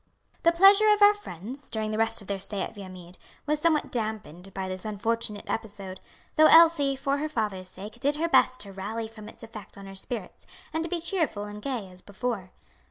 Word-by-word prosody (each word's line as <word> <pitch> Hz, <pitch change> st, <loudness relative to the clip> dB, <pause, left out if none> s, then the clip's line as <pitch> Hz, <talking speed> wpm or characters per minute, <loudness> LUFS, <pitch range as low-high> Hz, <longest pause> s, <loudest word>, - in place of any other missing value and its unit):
The 335 Hz, -, +5 dB
pleasure 395 Hz, +5 st, +7 dB
of 415 Hz, 0 st, +4 dB
our 410 Hz, 0 st, +8 dB
friends, 265 Hz, -, -9 dB
during 215 Hz, -1 st, -2 dB
the 215 Hz, -, -2 dB
rest 225 Hz, 0 st, +1 dB
of 200 Hz, -, -14 dB
their 200 Hz, -1 st, -2 dB
stay 195 Hz, +1 st, -3 dB
at -, -, -4 dB
Viamede, 185 Hz, -3 st, -11 dB, 0.3 s
was 300 Hz, 0 st, 0 dB
somewhat 320 Hz, -2 st, +2 dB
dampened 210 Hz, -6 st, -4 dB
by 190 Hz, 0 st, -4 dB
this 185 Hz, 0 st, -5 dB
unfortunate 215 Hz, 0 st, -2 dB
episode, 200 Hz, -4 st, -5 dB, 0.4 s
though 310 Hz, 0 st, +8 dB
Elsie, 320 Hz, -5 st, +6 dB
for 275 Hz, +1 st, -1 dB
her 305 Hz, +1 st, -2 dB
father's 210 Hz, -8 st, -2 dB
sake, 205 Hz, +5 st, -9 dB
did 285 Hz, +3 st, +1 dB
her 325 Hz, +3 st, 0 dB
best 255 Hz, -5 st, +4 dB
to 200 Hz, -, -5 dB
rally 220 Hz, +4 st, -4 dB
from 220 Hz, -1 st, -11 dB
its -, -, -15 dB
effect 220 Hz, -3 st, -10 dB
on 195 Hz, -, -10 dB
her 195 Hz, -, -9 dB
spirits, 195 Hz, +1 st, -6 dB, 0.3 s
and 320 Hz, -, 0 dB
to 330 Hz, -, -3 dB
be 350 Hz, -, -1 dB
cheerful 320 Hz, -, -1 dB
and 210 Hz, 0 st, -8 dB
gay 245 Hz, -5 st, -3 dB
as 180 Hz, 0 st, -13 dB
before. 205 Hz, -2 st, -4 dB
220 Hz, 210 wpm, -27 LUFS, 195-290 Hz, 0.4 s, our